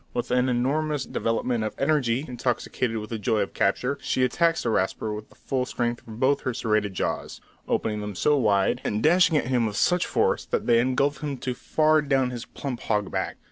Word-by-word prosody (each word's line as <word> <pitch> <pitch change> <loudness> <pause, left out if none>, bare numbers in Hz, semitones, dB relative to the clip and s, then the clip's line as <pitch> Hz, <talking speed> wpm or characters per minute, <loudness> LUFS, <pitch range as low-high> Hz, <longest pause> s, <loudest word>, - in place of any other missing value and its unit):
With 120 - -2
an 125 +1 +2
enormous 140 +4 0
development 115 0 -1
of 110 - -3
energy, 135 -3 +1
intoxicated 120 -1 -2
with 105 0 -6
the 115 - -3
joy 110 0 +1
of 100 - -3
capture, 125 +8 0
she 130 - 0
attacks 165 +6 +2
the - - 0
Rasper 105 +2 -1
with 105 0 -7
the - - -21
full 130 -2 -2
strength 120 -1 -3
of 110 0 -9
both 135 +2 +2
her 130 -3 -2
serrated 105 -4 0
jaws, - - -3 0.3
opening 105 -1 -1
them 105 -1 -5
so 150 +10 +3
wide, 105 -7 +2
and 105 +2 -1
dashing 170 0 +5
at 145 - 0
him 120 -2 +1
with 105 -1 -4
such 180 -1 +2
force, - - +1
that - - -2
they 115 -1 +4
engulf 135 +3 +1
him 145 -3 -3
to 130 - -2
far 155 +4 +2
down 135 -3 +1
his 120 -1 -6
plump 130 -4 -5
hog 105 -5 -1
back. - - -2
125 Hz, 210 wpm, -25 LUFS, 110-140 Hz, 0.3 s, dashing